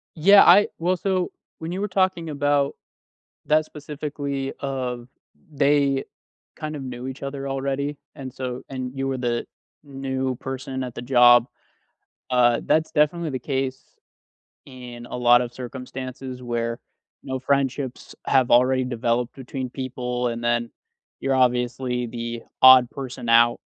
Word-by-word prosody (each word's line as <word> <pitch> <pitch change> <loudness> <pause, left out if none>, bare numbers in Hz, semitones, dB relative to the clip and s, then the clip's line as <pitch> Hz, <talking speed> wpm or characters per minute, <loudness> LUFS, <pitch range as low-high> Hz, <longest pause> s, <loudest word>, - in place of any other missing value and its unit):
Yeah, 200 +6 +7
I 195 +4 +7
well, 180 +2 +1
so, 185 -1 -1 0.3
when 160 +1 -5
you 190 +2 -3
were 205 - 0
talking 185 -4 0
about 145 -1 +1 0.7
that 155 0 +3
specifically 145 -2 -5
of 125 -3 -4 0.4
they 140 -1 +2 0.5
kind 155 0 -5
of 135 - -7
knew 125 0 -6
each 130 +1 -7
other 140 0 -5
already, 140 +1 -2 0.2
and 130 -3 -8
so 125 -1 -5
and 130 -1 -5
you 135 0 -1
were 135 -1 -2
the 120 -1 -1 0.4
new 135 -2 -3
person 130 +1 -5
at 125 -2 -7
the - - -6
job, 120 -1 +6 0.8
uh, 120 -2 +4
that's 160 +1 +2
definitely 155 +2 +1
the 130 -2 -3
case 130 0 -4 0.7
in 125 -2 -10
a - - -5
lot 120 0 +5
of 120 0 -5
circumstances 130 0 -7
where, 115 0 -2 0.4
no 130 -1 -3
friendships 135 -1 -2
have 130 -2 +3
already 130 +1 +4
developed 120 0 -1
between 130 -1 -6
people, 125 -1 -3
and 115 0 -5
then 120 0 0 0.5
you're 135 0 0
obviously 125 0 +1
the 115 0 -5 0.2
odd 130 -1 +9
person 130 -3 -7
out 120 +1 +5
130 Hz, 140 wpm, -23 LUFS, 125-140 Hz, 0.8 s, odd